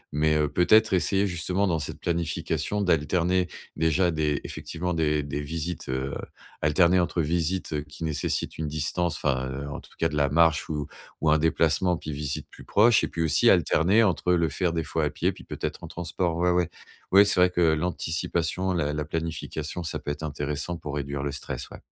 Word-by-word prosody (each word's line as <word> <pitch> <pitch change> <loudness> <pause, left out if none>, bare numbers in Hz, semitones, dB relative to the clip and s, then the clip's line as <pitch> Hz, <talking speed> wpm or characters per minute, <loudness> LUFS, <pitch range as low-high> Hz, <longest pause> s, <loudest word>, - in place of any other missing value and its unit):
mais, 75 +1 +3
heu, 75 -1 +2
peut-être 105 +8 +4
essayer 95 +2 +2
justement, 90 +1 0
dans 85 -4 +1
cette 75 - -6
planification, 85 +4 -1
d'alterner 90 +2 +2 0.3
déjà 80 +3 +2
des- 75 -2 0
effectivement- 90 +2 -4
des 75 -2 +1
des 70 +1 -4
visites, 80 +3 -4
heu 65 +2 -2 0.5
alterner 85 +5 +4
entre 85 -1 0
visites, 85 +2 -1
heu, 75 - -1
qui 75 +2 -10
nécessitent 75 -3 -2
une 80 - -2
distance 80 +3 -1
enfin, 65 -3 0
heu, 70 +2 -5
en 70 - -5
tout - - -16
cas 80 - +1
de - - -5
la 70 -1 +2
marche 80 -1 +3
ou 75 -2 -2 0.4
ou 80 - +2
un 75 - +4
déplacement, 80 +2 +2
puis 75 - -6
visites 70 -1 -4
plus - - -14
proches 110 +1 +4
et - - +1
puis 85 - -4
aussi 80 - +4
alterner 100 +8 +4
entre 90 -3 +2
le 85 -3 +2
faire 90 +3 0
des 80 - -1
fois - - -1
à - - +1
pied, - - 0
puis - - -13
peut-être - - -5
en - - -6
transport. 85 0 -2
Ouais, 90 +1 +2
ouais. 90 -1 +1 0.4
Ouais, 100 +2 +8
c'est 100 - +2
vrai 90 0 +6
que 90 - 0
l'anticipation, 85 +2 -1
la 75 -4 0
la 75 0 -2
planification, 80 +1 -4
ça 80 - -3
peut - - -6
être 75 - -6
intéressant 75 +3 -3
pour 75 -3 -6
réduire 70 -1 -3
le 70 - -2
stress. 70 - -5
Ouais. - - -12
80 Hz, 200 wpm, -26 LUFS, 75-90 Hz, 0.5 s, Ouais